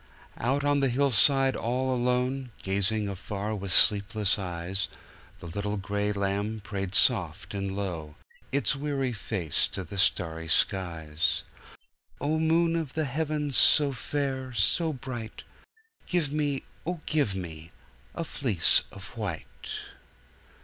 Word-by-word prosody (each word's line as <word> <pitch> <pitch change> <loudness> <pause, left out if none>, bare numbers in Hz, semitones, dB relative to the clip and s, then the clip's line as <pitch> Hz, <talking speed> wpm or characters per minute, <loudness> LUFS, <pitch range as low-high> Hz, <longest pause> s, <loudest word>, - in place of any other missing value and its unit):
Out 135 +5 0
on 145 0 +3
the 135 -1 +2
hillside 135 +1 +4
all 130 +3 -1
alone, 125 +1 0
gazing 100 +2 0
afar 100 +2 -4
with 100 -2 -4
sleepless 105 +1 +5
eyes, 90 +1 -3 0.5
The - - -10
little 100 +5 -3
gray 100 +2 -1
lamb 100 +2 -1
prayed 95 -2 -3
soft - - +3
and 100 -1 -3
low, 85 -7 -4 0.4
its 140 +1 +2
weary 135 -3 -2
face 100 -8 0
to 95 - -5
the 95 +3 -5
starry 80 -3 +1
skies:"O 85 - -2
moon 165 +1 +3
of 160 -5 -3
the 160 -1 -1
heavens 150 0 -2
so 145 -2 +6
fair, 135 -1 -3
so 155 - +2
bright, 125 -5 -7 0.6
Give 165 -6 0
me 145 -3 -1 0.2
oh, 170 0 -4
give 145 -11 +1
me 80 -3 -7 0.5
a 170 - -2
fleece 120 - +2
of 100 +4 -10
white!" 95 - -6
110 Hz, 125 wpm, -28 LUFS, 95-140 Hz, 0.6 s, so